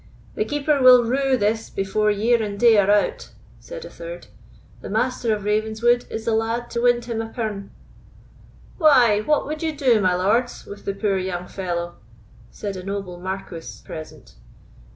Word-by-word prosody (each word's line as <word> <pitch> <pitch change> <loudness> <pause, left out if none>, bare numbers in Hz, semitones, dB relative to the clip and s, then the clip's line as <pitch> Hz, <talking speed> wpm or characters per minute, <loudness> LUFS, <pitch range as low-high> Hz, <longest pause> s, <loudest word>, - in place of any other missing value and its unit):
"The 430 - -1
Keeper 295 -2 0
will 250 -1 +8
rue 265 +2 +1
this 220 +1 -1
before 195 +2 0
year 225 +3 +2
and 205 -2 -4
day 235 -1 +6
are 200 0 +2
out," 205 0 +1 0.3
said - - -9
a - - -9
third; - - -9 0.6
"the - - -8
Master 250 -2 0
of 210 -2 -1
Ravenswood 220 +3 +1
is 220 0 -5
the 230 - +1
lad 230 +2 -1
to 235 - -2
wind 240 -1 +2
him 230 -2 -3
a 225 - -6
pirn." 215 -4 -4 1.1
"Why, 255 - +5
what 295 +8 +1
would 305 +1 -5
you 320 -2 -2
do, 245 -6 +3
my 185 -2 +2
lords, 225 +7 0
with 200 0 -11
the 200 - -2
poor 195 -2 0
young 180 -1 -4
fellow?" 175 -2 -4 0.5
said 200 -2 -6
a 185 - -7
noble 195 -2 -5
Marquis 185 -2 -7
present. 155 -1 -10
220 Hz, 170 wpm, -22 LUFS, 200-245 Hz, 1.1 s, will